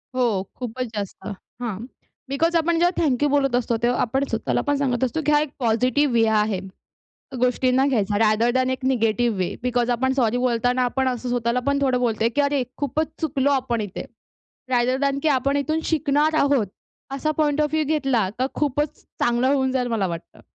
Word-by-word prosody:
हो, 235 -7 +1
खूपचं 250 0 -4
जास्त. 200 -2 -6 0.4
हां. 225 -6 -3 0.5
बिकॉज 330 +5 +1
आपण 335 0 +2
जेव्हा 350 +1 +4
थँक 290 -4 +1
यू 290 - +3
बोलत 275 -3 +2
असतो, 240 -1 0
तेव्हा 245 +1 +2
आपण 265 +4 0
स्वतःला 225 0 -1
पण 290 - +2
सांगत 265 -3 0
असतो, 290 +5 -1
की 300 - +2
हा 295 - +5
एक 300 - -2
पॉझिटिव्ह 250 +4 +1
वे 230 -1 +4 0.2
आहे 210 -3 -1 0.8
गोष्टींना 255 +1 +2
घ्यायचा, 210 -6 +1
रादर 220 +2 +3
दॅन 260 0 +2
एक 260 0 -4
निगेटिव्ह 235 -3 +1
वे. 180 -2 -1
बिकॉज 245 -1 0
आपण 260 +2 +1
सॉरी 245 -3 +1
बोलताना 245 0 +1
आपण 260 +1 0
असं 250 0 -3
स्वतःला 245 0 0
पण 280 0 +2
थोडं 255 -2 +2
बोलतोय 230 -2 +1
की - - +4
अरे, 280 -2 +1
खूपचं 300 +3 -2
चुकलो 280 -3 +1
आपण 255 -4 0
इथे. 205 -3 -5 0.7
रादर 250 +1 +2
दॅन 280 -1 +1
की 315 - +2
आपण 275 0 +1
इथून 310 +3 0
शिकणार 305 0 +1
आहोत 280 -6 +2 0.5
असा 290 +3 -1
पॉइंट 300 -1 +2
ऑफ 300 -1 +1
व्ह्यू 310 -1 +2
घेतला 270 -9 +1
तर 260 - +1
खूपचं 295 +1 -1 0.2
चांगलं 240 +2 +2
होऊन 265 -2 +1
जाईल 250 -2 0
मला 220 -5 0
वाटतं. 170 -1 -8
255 Hz, 190 wpm, -23 LUFS, 235-280 Hz, 0.8 s, हा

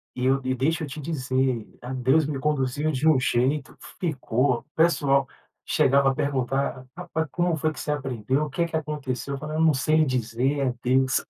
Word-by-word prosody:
E 125 - -2
eu 135 +1 +3
e 130 0 0
deixa 160 +6 0
eu 150 - -3
te 140 +3 -7
dizer, 130 -5 -1 0.2
ah, 125 +2 -6
Deus 130 +5 +3
me 140 -2 -3
conduziu 145 +1 0
de 145 +3 0
um 150 -4 +5
jeito. 130 +3 0 0.2
Ficou. 130 -6 0
O - - -23
pessoal 140 -5 +3 0.4
chegava 140 0 +3
a 135 - -4
perguntar: 135 -2 -1
"Rapaz, 160 -3 -3
como 175 -1 +1
foi 155 +1 0
que - - -9
você 150 - -2
aprendeu? 135 -1 -1
O - - -7
que 170 +4 0
que 165 - -5
aconteceu?" 140 -4 -3
Eu - - -5
falei: 155 +1 -5
"Eu - - +1
não 160 -2 +5
sei 155 +4 +2
lhe 155 - +4
dizer. 130 +2 0
É 130 -3 +1
Deus". 130 +1 +2
135 Hz, 205 wpm, -25 LUFS, 130-155 Hz, 0.4 s, um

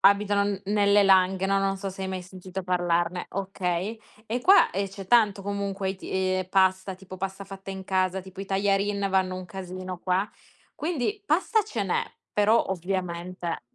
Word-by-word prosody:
abito 200 +1 +4
n 200 -1 -1
nelle 205 0 +4
Langhe, 190 -1 +4
no 195 0 +2
non 195 0 0
so 195 0 -4
se 190 +1 -7
hai 190 - -2
mai 185 -1 -4
sentito 185 +1 -7
parlarne, 175 -1 0
okay, 190 +2 -2 0.3
e 235 +3 -1
qua, 380 +9 +6
ehm, 200 +1 -1
c'è 195 -1 -9
tanto 205 -3 +4
comunque 200 -1 -2
i 190 - -6
t - - -24
eh, 185 0 0
pasta, 190 0 +2
tipo 185 0 -11
pasta 195 +1 -4
fatta 195 0 -9
in 190 0 -6
casa, 185 0 +1
tipo 190 +1 -10
i - - -4
tajarin 200 +1 +1
vanno 185 -1 +1
un 185 - -6
casino 185 -1 -6
qua. 185 +3 0 0.5
Quindi, 340 - -2
pasta 395 +6 +2
ce 225 -10 -3
n'è, 190 - 0 0.3
però 210 +3 +4
ovviamente 180 -1 -3
190 Hz, 180 wpm, -26 LUFS, 185-200 Hz, 0.5 s, qua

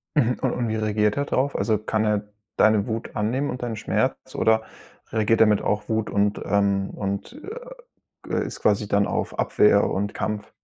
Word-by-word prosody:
Mhm, 125 -4 +2
und - - +1
und 120 -2 -2
wie 110 - -1
reagiert 105 +1 +1
er 140 - 0
drauf? 140 0 0
Also, 110 -2 +1
kann 110 +1 -1
er 105 -1 +1 0.4
deine 110 -1 +4
Wut 115 +2 -4
annehmen 120 +7 0
und 125 -1 -5
deinen 115 -2 -3
Schmerz? - - -2
Oder 110 0 +3 0.5
reagiert 110 +1 +2
er 110 - +7
mit 105 -1 +3
auch 105 +2 -1
Wut 110 -1 0
und, 100 0 +1
ähm, 100 -1 +1
und, 100 - -4
äh, 445 +4 -7 0.6
g - - -3
ist - - -6
quasi 105 0 +2
dann 100 0 +2
auf - - -3
Abwehr 105 -1 +4
und 100 +2 -2
Kampf? 105 -1 -4
110 Hz, 190 wpm, -24 LUFS, 100-115 Hz, 0.6 s, er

